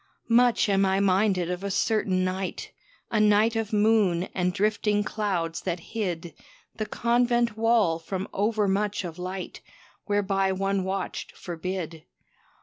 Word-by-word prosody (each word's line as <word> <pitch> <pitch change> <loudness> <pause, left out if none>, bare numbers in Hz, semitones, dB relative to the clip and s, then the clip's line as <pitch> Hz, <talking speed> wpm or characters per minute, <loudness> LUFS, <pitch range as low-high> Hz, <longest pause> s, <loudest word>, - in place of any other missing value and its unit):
Much 245 -1 +4
am 195 -1 +3
I 190 0 +2
minded 190 -2 +2
of 180 +1 -4
a 200 - -2
certain 195 -2 +1
night 185 0 -4 0.4
A 220 - +2
night 215 +2 +4
of 225 -2 -2
moon 210 -5 +3
and 180 -1 0
drifting 210 +2 +1
clouds 180 -6 -2
that 180 -2 -2
hid 175 -7 -3 0.4
The 215 -1 -3
convent 240 0 +1
wall 220 -7 +2
from 190 +3 -4
overmuch 205 -1 0
of 175 -1 -7
light 185 +1 -6 0.5
Whereby 195 -2 +1
one 195 0 0
watched 190 0 -4
forbid. 170 -2 -5
195 Hz, 135 wpm, -26 LUFS, 185-215 Hz, 0.5 s, Much